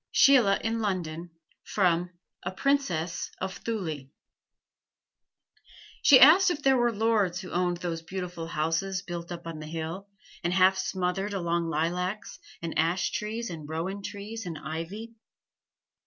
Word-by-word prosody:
SHEILA 245 -8 +5
IN 225 0 0
LONDON 175 -5 -2 0.3
From 180 -3 +1 0.3
'A 180 - -4
Princess 185 - 0
of 190 0 -3
Thule' 160 -12 -4 1.9
She 270 -3 +8
asked 350 +8 +8
if 300 -5 -3
they 270 - +5
were 240 -2 +3
lords 210 -5 +1
who 185 - -9
owned 175 0 0
those 170 -2 -4
beautiful 180 -1 -5
houses 165 +5 -1
built 175 -2 -6
up 170 -1 -7
on 165 -2 -6
the 155 - -7
hill, 165 +5 -5 0.4
and 175 +1 0
half 190 +1 +5
smothered 190 +1 -2
among 170 -2 0
lilacs 180 +6 -2 0.2
and 165 - -4
ash 170 +3 +1
trees 225 +1 -3
and 155 -3 -8
rowan 180 +5 -3
trees 205 +1 -6
and 165 -2 -5
ivy. 165 +10 -6
180 Hz, 140 wpm, -28 LUFS, 165-210 Hz, 1.9 s, She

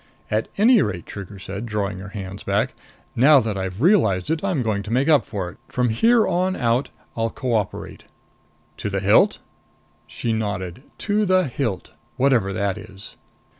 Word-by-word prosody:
"At 110 +1 0
any 225 +2 +6
rate," 85 -2 -2
Trigger 100 0 -8
said, 100 +4 -6
drawing 100 -3 -2
her 95 +1 -8
hands 100 -1 -7
back, - - 0 0.4
"now 140 +4 +7
that 110 -4 -2
I've 95 +4 -4
realized 150 - +3
it, 160 +2 -1
I'm 180 -10 0
going 105 -3 0
to 105 +2 -7
make 130 +4 +2
up 150 -3 +4
for 95 -5 -4
it. - - -19
From 125 -1 0
here 225 - +4
on 185 +1 +1
out, 120 +2 +1 0.3
I'll 115 0 0
cooperate." 115 -5 -3 0.7
"To - - -3
the 100 -1 -1
hilt?" 100 +1 +4 0.7
She 115 - -3
nodded. 100 -3 -3 0.3
"To 210 +1 +2
the 185 0 +4
hilt! 115 -7 -3 0.2
Whatever 125 -7 +2
that 100 0 -1
is." 100 -2 -10
110 Hz, 170 wpm, -22 LUFS, 100-140 Hz, 0.7 s, now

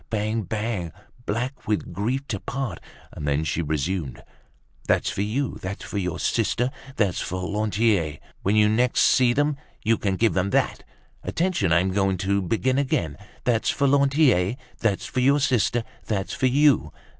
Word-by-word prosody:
Bang! 110 +1 -1
Bang! 105 -4 -3 0.4
Black 125 +6 -3
with 105 -1 -1
grief 130 +8 -2
to 100 - -2
part." 120 -7 -4 0.3
And 75 - -6
then 70 +2 +1
she 80 +2 -1
resumed, 80 0 -2 0.6
"That's - - +2
for - - -3
you, 120 +7 -2
that's 95 +2 -5
for 100 - -3
your 90 -4 -2
sister. 125 +2 0 0.2
That's 100 -8 +1
for 90 0 -3
Lantier. 105 -6 +1 0.2
When 100 +3 +1
you 105 0 +5
next 120 +4 +2
see 125 -2 +5
them, 145 +3 +1 0.3
You 115 0 +2
can 95 -2 0
give 115 +3 +2
them 95 +1 +1
that. - - 0 0.4
Attention! 165 - 0
I'm 90 +3 +3
going 95 -1 +1
to 100 +2 0
begin 130 +8 +1
again. 85 - 0 0.3
That's 115 -3 +1
for 140 - +1
Lantier, 135 - +3 0.2
that's 105 -4 0
for 130 - -3
your 140 +3 +4
sister. 120 -4 +1 0.2
That's 100 -3 -2
for 130 - +1
you. 135 - +3
105 Hz, 165 wpm, -24 LUFS, 95-125 Hz, 0.6 s, you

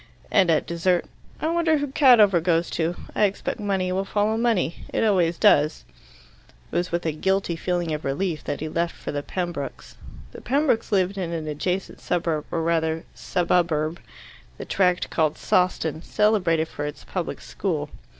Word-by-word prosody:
And 190 -4 +4
at 160 -2 +3
dessert: 170 +1 +1 0.3
"I - - -1
wonder 330 -2 +2
who 290 - -1
Cadover 240 - +5
goes 170 0 +1
to? 165 +1 -1 0.2
I 210 - +3
expect 200 +3 -3
money 195 -3 -1
will 190 +1 0
follow 210 +2 0
money. 225 -8 +1
It - - 0
always 180 -6 +2
does." 150 +1 +4 0.9
It - - -7
was 175 +1 0
with 170 0 -1
a 160 - +1
guilty 190 +3 0
feeling 175 -1 -1
of 150 - -4
relief 155 +3 -2
that 145 - -3
he 155 - -2
left 170 +2 -1
for - - -6
the 145 - -2
Pembrokes'. 175 -3 -5 0.3
The - - -10
Pembrokes 270 -4 +1
lived 195 0 +1
in 175 -3 -3
an 160 -2 -4
adjacent 180 +6 -3
suburb, 165 -3 -1
or 165 - -1
rather 160 -1 0
"sububurb," 170 -3 0 0.6
the - - -7
tract 180 -2 +1
called 155 -2 +1
Sawston, 165 -4 +1
celebrated 180 -7 +2
for 145 -2 -5
its 150 - -8
public - - -4
school. - - -3
175 Hz, 170 wpm, -24 LUFS, 160-195 Hz, 0.9 s, Cadover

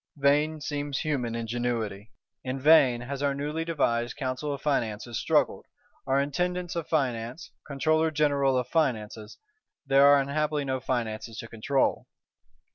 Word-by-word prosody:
Vain 145 +3 +2
seems 145 -2 -3
human 125 -7 -2
ingenuity. 115 -3 -3 0.3
In 130 +1 -3
vain 130 -4 +5
has 135 +2 -5
our 140 -1 +1
newly 150 +3 -3
devised 125 -8 -1
"Council 135 +1 -3
of 140 - -4
Finances" 120 -5 -2
struggled, - - +1 0.4
our 135 +1 +2
Intendants 175 +5 -2
of 170 -2 -3
Finance, 125 -2 -2 0.2
Controller 155 +3 +1
General 140 -3 +2
of 125 - -1
Finances: 110 -9 -2 0.5
there 135 +1 +5
are 145 0 +7
unhappily 150 +1 -1
no 130 -1 -1
Finances 115 -3 -3
to 115 - -6
control. 125 +5 0
135 Hz, 135 wpm, -27 LUFS, 120-150 Hz, 0.5 s, are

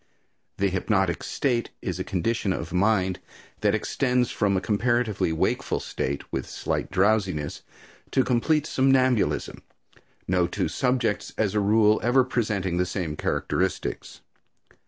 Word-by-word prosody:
The 100 0 +2
hypnotic 95 -2 0
state 120 -4 -1
is - - -4
a - - -1
condition 100 +1 -1
of - - -5
mind 95 -1 +2 0.4
that 105 0 +2
extends 125 +2 0
from 100 -2 +1
a - - +2
comparatively 110 0 0
wakeful 80 - 0
state, 70 +1 -3
with 65 - -3
slight - - -3
drowsiness, 95 -6 +1 0.5
to 130 - +2
complete 145 +5 +1
somnambulism, 130 -5 +2 0.7
no 90 -1 +2
two - - -2
subjects, 125 -5 -1
as 105 -3 +1
a 105 - +2
rule, 105 +1 +4
ever 125 +3 +4
presenting 105 -8 -1
the 90 - +2
same 85 -5 -3
characteristics. 95 +4 -2
105 Hz, 130 wpm, -25 LUFS, 95-120 Hz, 0.7 s, rule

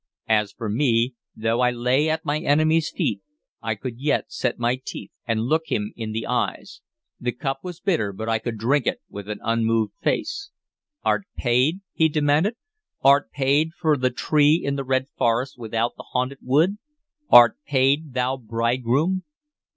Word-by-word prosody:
As 105 -2 +2
for 115 +1 -6
me, 115 +2 +1 0.2
though 115 +2 0
I 125 - +4
lay 125 +5 +1
at 160 +1 -1
my 150 0 0
enemy's 155 +1 +2
feet, - - -2 0.4
I - - -2
could 125 -2 -7
yet 145 +2 0
set 125 - -1
my 120 +2 0
teeth - - -7 0.2
and 115 -2 0
look 160 +7 0
him 105 0 -2
in 110 -2 -5
the 110 +1 -3
eyes. - - -2 0.4
The 125 - -1
cup 135 +2 -3
was 180 -2 -7
bitter, 165 - 0
but 110 +3 -6
I 115 -1 +1
could 115 0 -4
drink 130 +5 +1
it - - 0
with 100 0 -8
an 105 - -4
unmoved 115 -2 +1
face. 405 -4 -1 0.5
"Art 200 - +1
paid?" 130 +9 +2
he 160 0 +3
demanded. 150 +8 +2 0.5
"Art 140 +1 +5
paid 145 +4 +1
for 155 -2 +3
the 130 -2 +1
tree 150 +4 +3
in 140 0 0
the 135 - -3
red 130 0 0
forest 120 +3 0
without 115 +1 -2
the - - -10
haunted 130 +2 -1
wood? 160 +11 +2 0.5
Art 120 -2 +8
paid, 140 +1 +1
thou 125 +1 0
bridegroom?" 125 - 0
130 Hz, 170 wpm, -23 LUFS, 115-150 Hz, 0.5 s, Art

